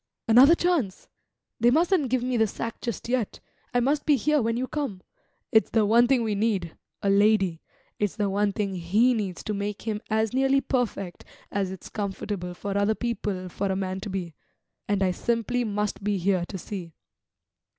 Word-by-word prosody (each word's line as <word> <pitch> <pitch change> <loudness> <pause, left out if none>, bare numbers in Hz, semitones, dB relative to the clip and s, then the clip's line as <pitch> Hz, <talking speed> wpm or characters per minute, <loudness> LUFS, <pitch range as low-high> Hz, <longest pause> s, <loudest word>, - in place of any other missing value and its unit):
"Another 255 +8 +8
chance! 335 - 0 0.5
They 235 +1 +5
mustn't 325 0 +3
give 255 0 +1
me 250 0 -1
the 225 -2 +3
sack 230 +3 -5
just 235 -3 -4
yet 240 -4 -1 0.3
I 245 - +2
must 280 +4 +1
be 300 - +4
here 300 +3 +2
when 230 0 0
you 255 - -1
come. 260 -12 -4 0.5
It's 220 - +4
the 220 -2 +3
one 235 +3 +5
thing 255 -2 +3
we 220 -2 0
need 200 -5 -1 0.3
a 200 - +2
lady. 200 -4 +3 0.4
It's 205 -2 0
the 205 -2 0
one 200 +1 +1
thing 200 -1 -2
he 200 +8 +3
needs 200 -6 -3
to 215 - -2
make 205 0 -4
him 215 -2 -2
as 220 0 +1
nearly 270 +1 +3
perfect 240 -9 -2 0.3
as 195 -2 -1
it's 190 -1 -8
comfortable 195 -3 -4
for 200 +2 -4
other 200 +2 +2
people 210 -6 -3
for 200 +3 -3
a 190 - 0
man 190 0 -2
to 205 - -6
be. 185 -4 -4 0.5
And 200 -1 +1
I 185 - +2
simply 235 +4 0
must 210 -2 -2
be 205 0 +1
here 185 -1 +1
to 195 - -6
see." 175 -3 -7
210 Hz, 190 wpm, -26 LUFS, 195-240 Hz, 0.5 s, Another